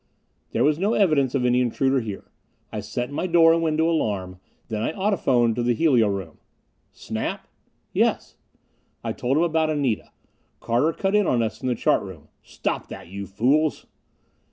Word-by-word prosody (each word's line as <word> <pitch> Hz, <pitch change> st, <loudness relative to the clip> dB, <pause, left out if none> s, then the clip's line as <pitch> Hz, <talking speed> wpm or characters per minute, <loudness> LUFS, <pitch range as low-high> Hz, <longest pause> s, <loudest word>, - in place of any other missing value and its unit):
There 115 Hz, -, +1 dB
was 150 Hz, +2 st, +2 dB
no 205 Hz, +5 st, +1 dB
evidence 150 Hz, -9 st, +2 dB
of 125 Hz, -2 st, +1 dB
any 125 Hz, 0 st, +3 dB
intruder 130 Hz, +2 st, +1 dB
here. 105 Hz, -5 st, -7 dB, 0.4 s
I 110 Hz, -, -4 dB
set 120 Hz, +5 st, -4 dB
my 160 Hz, +5 st, -2 dB
door 165 Hz, -2 st, +6 dB
and 165 Hz, -, +1 dB
window 160 Hz, 0 st, +1 dB
alarm. 100 Hz, -, -1 dB, 0.3 s
Then 110 Hz, -2 st, -3 dB
I 135 Hz, -, -1 dB
audiphoned 135 Hz, -, +2 dB
to -, -, +1 dB
the 120 Hz, 0 st, +1 dB
helio 125 Hz, -7 st, +3 dB
room. 95 Hz, -5 st, -4 dB, 0.5 s
"Snap?" -, -, -5 dB, 0.5 s
"Yes." -, -, 0 dB, 0.7 s
I -, -, -2 dB
told 130 Hz, +4 st, -1 dB
him 165 Hz, -, +3 dB
about 160 Hz, -2 st, +1 dB
Anita. 140 Hz, -8 st, -1 dB, 0.5 s
Carter 125 Hz, +8 st, +1 dB
cut 195 Hz, +4 st, -2 dB
in 210 Hz, -2 st, +3 dB
on 120 Hz, -2 st, +2 dB
us 110 Hz, -, -4 dB
from -, -, -4 dB
the 125 Hz, -, +1 dB
chart -, -, +2 dB
room. 85 Hz, -6 st, -11 dB
"Stop -, -, -4 dB
that, -, -, -10 dB
you 100 Hz, +1 st, -6 dB
fools!" 140 Hz, +10 st, +1 dB
130 Hz, 175 wpm, -24 LUFS, 110-160 Hz, 0.7 s, door